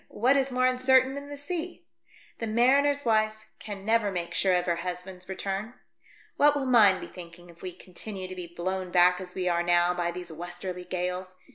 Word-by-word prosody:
What 255 +6 +2
is 270 -1 +1
more 255 0 +2
uncertain 260 +1 +4
than 280 +1 -7
the 290 - -7
sea? 345 +3 -5 0.5
The 230 - -3
mariner's 275 +5 +3
wife 215 -1 +1
can 200 -2 -7
never 220 -2 +2
make 175 -2 -4
sure 185 0 +2
of 180 0 +1
her 170 -1 0
husband's 180 +1 -6
return. 195 +5 -4 0.6
What 290 0 +5
will 280 -2 -1
mine 215 -7 +5
be - - -7
thinking 175 0 -12
if 170 - -20
we 185 - -5
continue 185 +2 -7
to 185 - -7
be 180 -1 -6
blown 185 +2 -3
back 180 +1 +4
as 180 -1 -9
we 185 -1 -2
are 170 -1 +2
now 175 0 +3
by 175 -1 -1
these 175 0 -7
westerly 175 +2 -7
gales? 180 +1 -3
190 Hz, 200 wpm, -28 LUFS, 180-250 Hz, 0.6 s, What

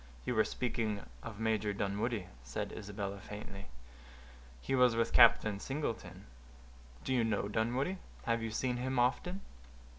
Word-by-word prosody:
"You - - 0
were 110 -2 +5
speaking 110 -4 -2 0.2
of 110 -2 -8
Major 110 -2 +1
Dunwoodie," 100 +1 -1 0.2
said - - -4
Isabella, 100 -1 -4
faintly. 100 -1 -8 0.9
"He 135 - -3
was 125 -3 +5
with 115 0 +1
Captain 105 -2 +7
Singleton." 135 -1 -4 0.8
"Do 130 - 0
you 125 -2 +3
know 105 -2 0
Dunwoodie? 120 - 0 0.3
Have 115 0 +1
you 115 - -2
seen 125 +3 -1
him 130 +1 -1
often?" 155 +10 +1
115 Hz, 140 wpm, -34 LUFS, 105-125 Hz, 0.9 s, Captain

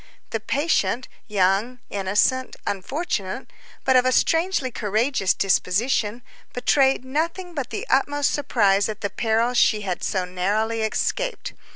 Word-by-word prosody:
The 225 - -1
patient, 245 - 0 0.2
young, 205 +4 +1
innocent, 205 +6 +1
unfortunate, 205 - -3 0.4
but 260 - +4
of 250 - +6
a 255 - +2
strangely 325 -2 +1
courageous 215 -1 0
disposition, 210 +4 +1 0.3
betrayed 265 +1 +2
nothing 335 +6 -2
but 275 -6 -4
the 420 - -4
utmost 290 0 +2
surprise 205 -8 +2
at 215 -1 -6
the 205 - -2
peril 230 +2 +1
she 220 -3 +3
had 185 -3 -3
so 185 -2 -1
narrowly 210 +5 -1
escaped. - - -2
230 Hz, 130 wpm, -23 LUFS, 200-270 Hz, 0.4 s, of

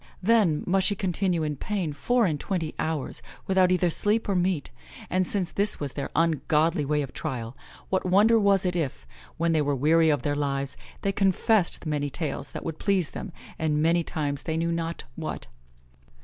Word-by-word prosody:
Then 200 -8 +3
must 190 +1 +3
she 205 - +1
continue 185 -3 0
in 150 -2 -2
pain 185 -3 -2
four 245 +9 +2
and 155 -5 0
twenty 165 -4 -2
hours, 155 -4 -2 0.2
without 185 -1 +3
either 180 -1 +2
sleep 210 +6 +1
or 200 - +1
meat; 180 -4 0 0.4
and 185 0 +1
since 190 -4 -1
this 205 +1 +1
was 145 -3 -3
their 140 0 -4
ungodly 160 -1 +2
way 150 +1 0
of 135 - -8
trial, 120 -1 -4 0.3
what 190 - +1
wonder 210 +5 +5
was 200 -2 +3
it 180 -1 0
if, 140 - -3 0.3
when 170 0 +1
they 160 -2 +3
were 145 -1 +1
weary 160 +4 +4
of 145 -2 +1
their 145 -1 0
lives, 140 -1 -2 0.3
they 200 - +2
confessed 195 -1 +2
many 145 -2 -1
tales 150 0 -4
that - - -7
would 160 -1 -5
please 195 -5 +1
them, 200 - -6 0.3
and 150 -1 +1
many 170 +1 +3
times 145 -3 -3
they 160 -1 -2
knew 170 +1 0
not 165 0 -3
what." 155 -1 -5
165 Hz, 190 wpm, -26 LUFS, 150-190 Hz, 0.4 s, wonder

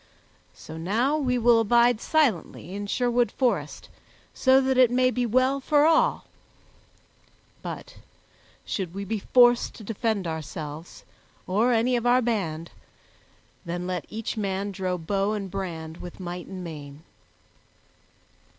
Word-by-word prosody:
So 160 - -10
now 225 - +1
we 255 -5 0
will 235 -1 +5
abide 235 +1 +3
silently 220 - 0
in 205 +1 -5
Sherwood 245 +2 +1
Forest, 200 - -1 0.5
so 260 0 +4
that 265 0 +1
it 255 -2 +6
may 255 +1 +2
be 245 -1 -1
well 255 +4 +2
for 290 +2 +3
all, 485 +10 +3 1.4
but - - -8 0.7
should 185 -3 -4
we 200 0 -4
be 220 +2 -2
forced 240 +3 +4
to 220 - -11
defend 220 -2 -2
ourselves, 160 0 -6 0.4
or 215 +7 +2
any 240 +2 +2
of 240 0 0
our 245 +1 +5
band, 170 -8 -2 0.9
then 175 0 -4
let 180 -4 -3
each 220 +1 -5
man 200 -1 -2
draw 185 -1 -2
bow 195 +5 -1
and 200 -3 -4
brand 165 -4 -5
with 175 +1 -10
might 180 -1 -6
and 185 -2 -7
main." 150 -3 -9
210 Hz, 135 wpm, -26 LUFS, 180-245 Hz, 1.4 s, it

